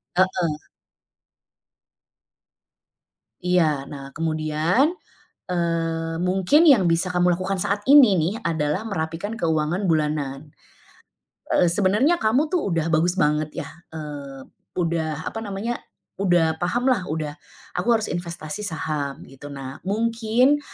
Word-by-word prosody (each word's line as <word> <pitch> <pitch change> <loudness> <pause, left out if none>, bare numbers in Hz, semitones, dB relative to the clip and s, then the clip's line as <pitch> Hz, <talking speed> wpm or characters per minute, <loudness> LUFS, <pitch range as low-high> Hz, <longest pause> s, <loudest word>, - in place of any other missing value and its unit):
Heeh. 180 -4 +1 2.8
Iya. 155 -6 +1
Nah, 140 -1 -9
kemudian, 160 - +1 0.5
eee, 165 -2 -1
mungkin 190 - +3
yang 230 - +6
bisa 175 +2 +1
kamu 180 -1 +3
lakukan 190 0 -2
saat 205 +1 -1
ini 260 -9 +7
nih, 165 +4 +1
adalah 160 +1 -1
merapikan 195 +1 -4
keuangan 160 +3 0
bulanan. 150 -3 -1 1.0
Eee, 180 - +3
sebenarnya 210 - +2
kamu 260 +8 +2
tuh, 360 - +2
udah 165 -1 0
bagus 175 +3 +2
banget 150 -2 +1
ya, 140 - -9 0.2
eee, 145 -4 -8 0.3
udah, 160 -3 -1
apa 225 - -5
namanya, 220 +3 -4 0.4
udah 170 -4 +2
paham 245 +9 +1
lah, 185 -6 -2
udah 155 -1 -3 0.4
"Aku 180 +6 -3
harus 225 -2 +3
investasi 170 +1 -5
saham", 155 -6 -3
gitu. 135 +2 -11
Nah, 135 -1 -8
mungkin 230 +7 +2
170 Hz, 115 wpm, -23 LUFS, 155-205 Hz, 2.8 s, ini